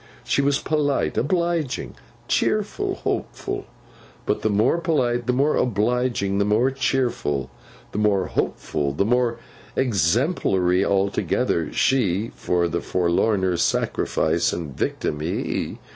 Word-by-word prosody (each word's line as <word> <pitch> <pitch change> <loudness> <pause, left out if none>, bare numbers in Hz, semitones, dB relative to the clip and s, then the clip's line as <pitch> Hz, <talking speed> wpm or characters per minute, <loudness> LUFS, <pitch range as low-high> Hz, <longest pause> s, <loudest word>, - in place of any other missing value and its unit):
She - - +1
was 140 0 +2
polite, 145 -2 0
obliging, 170 -1 -1 0.3
cheerful, - - 0
hopeful; - - -4 0.6
but, - - 0
the 110 - +1
more 105 +11 +2
polite, 125 -8 0
the - - +4
more 140 +4 +2
obliging, 120 -3 0
the - - +3
more 110 +6 +2
cheerful, 120 - -1 0.4
the 105 - -3
more 100 -3 +2
hopeful, 70 -5 -2
the 100 - +1
more 120 0 +1 0.4
exemplary 100 - +2
altogether, 100 -4 0
she; 110 -5 +1 0.2
the 85 -1 +1
forlorner 90 +1 +1
Sacrifice - - +1
and 75 -6 -5
Victim, 75 - -2
he. 80 +3 -2
110 Hz, 115 wpm, -23 LUFS, 90-130 Hz, 0.6 s, the